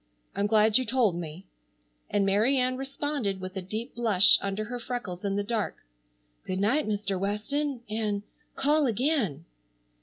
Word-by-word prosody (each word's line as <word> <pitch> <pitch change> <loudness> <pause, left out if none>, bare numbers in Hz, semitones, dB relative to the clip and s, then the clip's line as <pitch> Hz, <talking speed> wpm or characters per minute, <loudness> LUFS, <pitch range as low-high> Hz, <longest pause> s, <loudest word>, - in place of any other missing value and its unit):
I'm 200 +1 +1
glad 215 +1 +4
you - - 0
told 245 -8 +2
me," 170 +2 -7 0.6
and 205 -1 +2
Mary 215 +8 +3
Ann 255 0 +2
responded, 270 -6 -3
with 185 +1 -7
a 190 - -3
deep 215 +7 -5
blush 215 -5 +5
under 200 +2 -2
her 245 +3 -5
freckles 230 -7 -5
in 200 -1 -1
the 205 - 0
dark, 215 0 -2 0.7
"Good 185 0 -2
night, 245 +9 +2
Mr. 200 -2 -1
Weston, 240 +7 -2
and—call 225 +8 -1
again!" 230 - 0
215 Hz, 150 wpm, -28 LUFS, 195-255 Hz, 0.7 s, blush